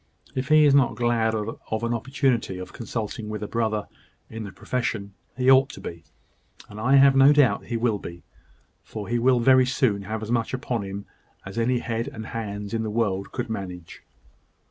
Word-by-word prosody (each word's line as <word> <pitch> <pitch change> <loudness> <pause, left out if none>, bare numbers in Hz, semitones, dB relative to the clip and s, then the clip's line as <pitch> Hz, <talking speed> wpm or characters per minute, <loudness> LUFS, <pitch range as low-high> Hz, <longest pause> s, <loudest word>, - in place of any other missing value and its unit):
If 130 0 -3
he 155 0 +6
is 145 - +5
not 140 -3 +4
glad 115 -2 +1
of 110 +1 -4
an 115 0 0
opportunity 120 -4 0
of 90 - -8
consulting 110 -1 -5
with 105 -1 -4
a - - -3
brother 110 -2 -1 0.4
in 110 -1 -6
the 100 - -7
profession, 105 -4 -3 0.2
he 130 0 +4
ought 135 +1 +6
to - - -10
be 85 -1 -8 0.6
and 105 - -10
I 125 +5 +3
have 135 0 +7
no 135 +1 +7
doubt 140 -8 +3
he 115 - -2
will 115 -3 0
be; 85 -1 -9 0.6
for 105 -3 -7
he 120 +1 0
will 125 +1 +4
very 130 +1 +5
soon 125 -6 +1
have 110 +2 -5
as 110 - -5
much 120 +1 0
upon 125 -3 -3
him 100 0 -6 0.4
as 95 +4 -5
any 125 +2 +2
head 115 -1 -3
and 110 0 -7
hands 105 -3 -5
in 115 - 0
the 110 - -2
world 105 -3 -1
could 120 -1 -3
manage." 95 -6 -7
115 Hz, 195 wpm, -25 LUFS, 105-125 Hz, 0.6 s, have